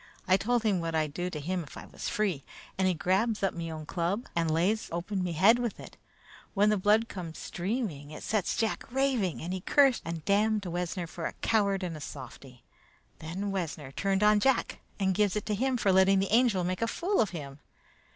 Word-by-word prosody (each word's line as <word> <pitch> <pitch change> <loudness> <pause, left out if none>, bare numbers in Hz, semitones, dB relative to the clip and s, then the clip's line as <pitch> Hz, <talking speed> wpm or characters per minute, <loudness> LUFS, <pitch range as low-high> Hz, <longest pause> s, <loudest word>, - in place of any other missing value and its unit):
I 185 - +6
told 235 +4 +1
him 205 -5 +2
what 165 -1 -2
I'd 155 -2 0
do 180 +3 -2
to 155 - -5
him 180 +5 -2
if 145 - -12
I - - -8
was - - -6
free, 195 - -1 0.3
and 190 0 +1
he 185 - +2
grabs 200 +6 +1
up 195 - +2
me 165 -1 -5
own 155 -1 -6
club 180 +8 -2
and 165 -1 +1
lays 180 +8 +1
open 180 +3 -2
me 175 -2 -2
head 200 +9 +5
with 240 -3 -3
it. - - -11 0.6
When 205 +1 +4
the 210 - +2
blood 210 +4 +3
came 170 -6 -7
streaming, 180 - -3
it 155 - -9
set 215 -4 0
Jack 225 0 -2
raving, 255 - 0
and 175 +2 -3
he 185 - -4
cursed 270 +4 +4
and 165 -1 -5
damned 210 +1 +2
Wessner 175 0 -3
for 165 0 -5
a - - -7
coward 200 -3 +2
and 170 -3 -3
a 155 - -8
softy. 130 -2 -10 0.6
Then 185 +6 -4
Wessner 160 -7 -4
turned 195 +6 0
on 210 0 +5
Jack 265 +2 +1 0.2
and 190 -1 +2
gives 205 0 +2
it 210 - -2
to 215 - -1
him 255 +4 0
for 200 -4 +2
letting 190 +1 +5
the 195 0 0
Angel 230 -6 +4
make 185 +2 -2
a 230 - +2
fool 365 - 0
of 210 - +1
him. 140 -5 -8
190 Hz, 220 wpm, -29 LUFS, 170-215 Hz, 0.6 s, I